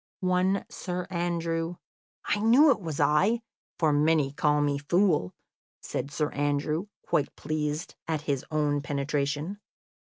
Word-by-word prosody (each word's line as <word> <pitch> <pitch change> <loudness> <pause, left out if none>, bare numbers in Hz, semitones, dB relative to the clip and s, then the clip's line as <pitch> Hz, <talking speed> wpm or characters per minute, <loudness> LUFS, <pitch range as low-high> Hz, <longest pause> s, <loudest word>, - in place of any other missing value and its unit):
"One 185 +2 +2
Sir 180 0 -4
Andrew 170 -1 -1 0.3
" - - -35
"I 205 - +1
knew 250 +8 +6
it 235 - 0
was 160 -5 -4
I, 205 +10 +3 0.3
for 155 -3 +3
many 150 -1 +3
call 150 0 +2
me 145 -1 +1
fool," 170 - +2 0.4
said - - -4
Sir 150 +1 -1
Andrew, 145 +5 -1 0.2
quite 145 - 0
pleased 155 +1 -3
at 160 -2 -1
his 140 -3 -1
own 150 -2 +1
penetration. 145 +5 -2
155 Hz, 135 wpm, -28 LUFS, 145-180 Hz, 0.4 s, knew